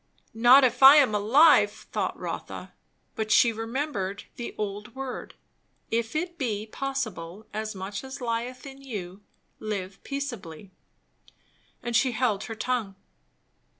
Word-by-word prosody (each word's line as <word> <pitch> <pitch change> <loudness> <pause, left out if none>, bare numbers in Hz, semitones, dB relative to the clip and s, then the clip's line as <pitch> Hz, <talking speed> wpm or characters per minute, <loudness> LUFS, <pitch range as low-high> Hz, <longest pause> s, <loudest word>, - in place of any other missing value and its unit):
Not 240 +5 +7
if 255 - +2
I 270 +2 +11
am 275 -8 +5
alive! 220 +3 +6
thought - - -4
Rotha; - - -6 0.4
but 220 -1 -3
she 235 +1 +5
remembered 225 -4 -3
the 240 - -6
old 210 +2 -5
word 265 -1 -6 0.6
"If 230 +3 -1
it 345 +2 -3
be 215 -6 -2
possible, 220 -7 -5
as 215 0 -4
much 195 +3 -5
as 265 +1 -8
lieth 245 +1 -3
in 275 0 -10
you, 200 -7 -7 0.4
live 195 -3 -5
peaceably 215 - -6 0.6
" - - -37
and 240 -1 -2
she 250 +2 +3
held 220 -4 0
her 225 - -6
tongue. 220 -3 -2
230 Hz, 135 wpm, -27 LUFS, 205-265 Hz, 0.6 s, I